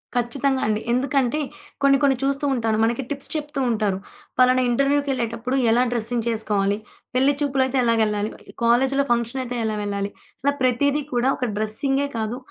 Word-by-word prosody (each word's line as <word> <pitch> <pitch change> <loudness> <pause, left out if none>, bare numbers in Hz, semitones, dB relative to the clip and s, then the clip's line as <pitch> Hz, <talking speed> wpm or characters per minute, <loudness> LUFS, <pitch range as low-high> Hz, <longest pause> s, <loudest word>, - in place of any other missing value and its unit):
ఖచ్చితంగా 260 +3 0
అండి. 215 0 0
ఎందుకంటే 265 +2 +1 0.4
కొన్ని 275 0 +6
కొన్ని 275 -1 +4
చూస్తూ 275 +1 0
ఉంటాను, 225 -3 0
మనకి 235 +4 +1
టిప్స్ 280 -1 -3
చెప్తూ 295 -1 -3
ఉంటారు. 210 -4 0 0.4
ఫలానా 255 0 +5
ఇంటర్‌వ్యూ‌కెళ్ళేటప్పుడు 255 -2 0 0.2
ఎలా 240 - +4
డ్రెస్సింగ్ 235 0 -1
చేసుకోవాలి, 205 -3 0 0.4
పెళ్లి 270 +3 +4
చూపులయితే 270 -2 +1
ఎలాగెళ్ళాలి, 215 -2 +1 0.3
కాలేజిలో 265 +4 +3
ఫంక్షనయితే 240 +1 -1
ఎలా 215 -1 -1
వెళ్ళాలి, 200 0 -2 0.3
ఇలా 285 +1 +3
ప్రతీది 280 +4 +2
కూడా 245 +2 +2
ఒక 250 - -1
డ్రెస్సింగే 270 +6 +1
కాదు 220 +2 -2
245 Hz, 140 wpm, -23 LUFS, 225-275 Hz, 0.4 s, కొన్ని